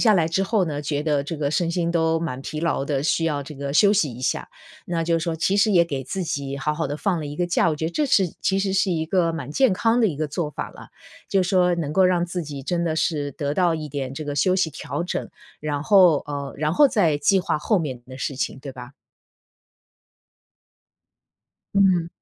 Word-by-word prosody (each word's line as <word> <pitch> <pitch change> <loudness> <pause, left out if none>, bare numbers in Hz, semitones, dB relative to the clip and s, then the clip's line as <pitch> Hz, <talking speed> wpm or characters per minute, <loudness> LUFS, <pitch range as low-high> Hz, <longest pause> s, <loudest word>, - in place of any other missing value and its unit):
下 220 -3 +5
来 170 -4 +3
之 190 +4 0
后 200 -1 +1
呢， 150 -3 -4
觉 145 0 -2
得 150 -2 +1
这 155 +3 -5
个 145 -1 -1
身 165 +2 0
心 170 -1 0
都 160 -1 +2
蛮 150 -6 -4
疲 155 - -5
劳 165 -5 0
的， 140 -2 -1
需 165 0 +1
要 150 -3 0
这 150 +2 -10
个 140 0 -4
休 200 +6 +5
息 155 - +1
一 120 - -10
下。 130 - -1 0.4
那 165 -2 -1
就 170 0 +2
是 - - -5
说， 165 -2 -2
其 190 +5 +1
实 215 +2 +4
也 175 -4 +5
给 140 -5 -4
自 190 -2 -3
己 140 -2 -3
好 150 +2 -1
好 160 -1 -2
地 145 - -3
放 180 +1 -1
了 150 - -5
一 145 +1 -7
个 175 - 0
假， 175 -1 +2
我 155 - -2
觉 160 - -4
得 - - -2
这 300 - +1
是 200 -8 +4 0.2
其 195 - +1
实 195 -1 0
是 195 0 +2
一 160 -2 -1
个 170 -1 +1
蛮 145 -5 -5
健 260 - +3
康 230 +5 +2
的 225 - +4
一 150 - -4
个 155 - -1
做 150 +1 -3
法 - - -5
了。 - - -13 0.4
就 195 - +2
说， 180 -1 +3
能 150 -3 -3
够 190 +2 +4
让 175 -1 +2
自 175 0 -3
己 140 -3 -7
真 175 +2 -1
的 160 -1 -1
是 150 -3 0
得 145 +2 -3
到 175 -2 +2
一 155 -1 -6
点 135 -2 -4
这 155 +2 -5
个 145 -1 -4
休 185 +6 +2
息 175 -4 +1
调 155 +3 -4
整， - - -4 0.3
然 145 -1 -2
后 180 -7 +6
呃， 140 -2 -5
然 150 +2 0
后 290 - +6
再 175 - +2
计 195 +5 +3
划 180 - -1
后 200 +6 +1
面 130 -7 -4
的 130 +1 -10
事 140 - -3
情， 135 - -3
对 135 0 -8
吧？ 125 -1 -10 2.9
嗯。 185 -4 +4
165 Hz, 260 characters per minute, -23 LUFS, 145-180 Hz, 2.9 s, 后